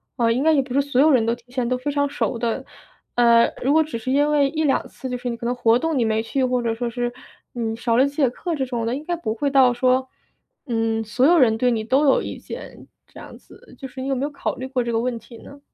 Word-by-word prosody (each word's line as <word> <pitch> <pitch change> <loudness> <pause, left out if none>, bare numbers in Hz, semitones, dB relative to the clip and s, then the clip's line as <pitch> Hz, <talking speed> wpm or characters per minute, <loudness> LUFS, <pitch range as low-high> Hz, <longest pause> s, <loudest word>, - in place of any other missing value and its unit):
啊， 230 -3 +2
应 250 +4 0
该 320 0 +4
也 280 - +3
不 260 -1 -7
是 280 - +3
所 275 -2 +1
有 310 +1 +5
人 240 -4 +3
都 230 +1 +1
提 245 +1 -23
前 250 -2 -1
都 255 - 0
非 270 +3 -3
常 285 0 +1
熟 275 -4 -2
的。 230 -1 -2 0.5
呃， 235 -1 +5
如 275 +4 +2
果 320 - +5
只 305 -7 -5
是 230 +3 -6
因 290 +2 +3
为 285 -2 +3
1-2 310 -2 0
次， 260 - -8
就 250 - -3
是 245 - -6
你 235 - -3
可 235 - -8
能 245 - 0
活 235 -1 +3
动 325 -2 -1
你 230 - +2
没 220 0 0
去， 260 +3 -1
或 250 -1 0
者 230 -1 0
说 240 +1 -3
是 240 +1 -2 0.4
你 225 -2 -3
少 230 0 0
了 265 - +5
几 280 - -9
节 275 -5 +3
课 335 +6 -4
这 270 - -1
种 240 -3 -3
的 235 - -1
应 290 - -6
该 350 +2 -2
不 320 -11 -3
会 280 +5 -1
到 260 -3 +5
说， 255 +1 +1 0.6
嗯， 225 -1 0
所 240 +5 +1
有 340 +3 +5
人 225 -5 +4
对 250 +2 +2
你 225 -2 -1
都 270 +6 +2
有 270 - +4
意 - - -6
见， - - -10 0.2
这 - - -14
样 - - -11
子， - - -18
就 265 - -6
是 260 +1 -9
你 265 - -4
有 275 - 0
没 265 +1 -2
有 290 - -1
考 285 - -4
虑 260 +1 -5
过 260 -2 -1
这 235 - -3
个 225 - +1
问 245 0 -2
题 230 +1 -14
呢？ 280 - -13
250 Hz, 310 characters per minute, -22 LUFS, 235-280 Hz, 0.6 s, 有